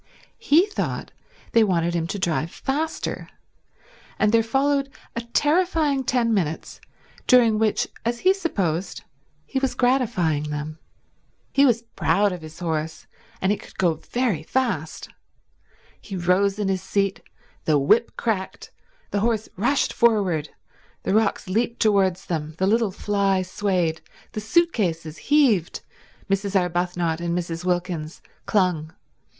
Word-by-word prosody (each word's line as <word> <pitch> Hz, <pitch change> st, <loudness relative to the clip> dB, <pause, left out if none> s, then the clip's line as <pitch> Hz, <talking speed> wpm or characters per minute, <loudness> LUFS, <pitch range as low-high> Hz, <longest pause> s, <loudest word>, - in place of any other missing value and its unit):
He 345 Hz, -5 st, +4 dB
thought 420 Hz, -, -4 dB, 0.4 s
they 230 Hz, -, +5 dB
wanted 170 Hz, -4 st, +1 dB
him 165 Hz, -1 st, -1 dB
to 200 Hz, -, -4 dB
drive 165 Hz, -3 st, -1 dB
faster; 300 Hz, -, -3 dB, 0.9 s
and 210 Hz, -, +3 dB
there 230 Hz, 0 st, +5 dB
followed 275 Hz, +4 st, +1 dB, 0.3 s
a 235 Hz, -, -2 dB
terrifying 295 Hz, +2 st, +1 dB
ten 240 Hz, -3 st, +1 dB
minutes 165 Hz, -6 st, -2 dB, 0.5 s
during 235 Hz, -4 st, +5 dB
which, 220 Hz, -1 st, +1 dB, 0.2 s
as 235 Hz, +1 st, -2 dB
he 375 Hz, +1 st, +5 dB
supposed, 195 Hz, -, -2 dB, 0.4 s
he 270 Hz, -, -2 dB
was 270 Hz, -1 st, -1 dB
gratifying 185 Hz, -, +1 dB
them. 150 Hz, +1 st, -5 dB, 0.7 s
He 275 Hz, 0 st, +5 dB
was 230 Hz, -2 st, +2 dB
proud 200 Hz, -2 st, +1 dB
of 180 Hz, -2 st, -6 dB
his 155 Hz, 0 st, -11 dB
horse, 160 Hz, -2 st, -3 dB, 0.4 s
and 190 Hz, -, +2 dB
it 210 Hz, -, -1 dB
could -, -, -15 dB
go 175 Hz, -3 st, +3 dB
very 220 Hz, -, -2 dB
fast. 185 Hz, -, -2 dB, 0.9 s
He 200 Hz, -, -7 dB
rose 185 Hz, +3 st, +2 dB
in 205 Hz, -2 st, -1 dB
his 190 Hz, -1 st, 0 dB
seat, 195 Hz, 0 st, -1 dB, 0.4 s
the 155 Hz, -2 st, +3 dB
whip 215 Hz, +12 st, +2 dB
cracked, 205 Hz, -5 st, -3 dB, 0.4 s
the 205 Hz, -, 0 dB
horse 220 Hz, 0 st, 0 dB
rushed 240 Hz, +9 st, +1 dB
forward, 195 Hz, -10 st, +2 dB, 0.5 s
the -, -, 0 dB
rocks 215 Hz, -2 st, +1 dB
leaped 230 Hz, +5 st, -1 dB
towards 195 Hz, -4 st, +2 dB
them, 155 Hz, -2 st, -3 dB
the 190 Hz, -, +1 dB
little 225 Hz, +2 st, +2 dB
fly 195 Hz, -1 st, 0 dB
swayed, 180 Hz, -4 st, -1 dB, 0.3 s
the 215 Hz, -, -4 dB
suit 335 Hz, +11 st, +2 dB
cases 165 Hz, -6 st, -2 dB
heaved, 255 Hz, -, +3 dB, 0.5 s
Mrs. 195 Hz, 0 st, +1 dB
Arbuthnot 175 Hz, -2 st, -1 dB
and 170 Hz, 0 st, -1 dB
Mrs. 170 Hz, -1 st, -4 dB
Wilkins 175 Hz, -3 st, -2 dB, 0.2 s
clung. 175 Hz, -6 st, +1 dB
195 Hz, 135 wpm, -23 LUFS, 170-235 Hz, 0.9 s, they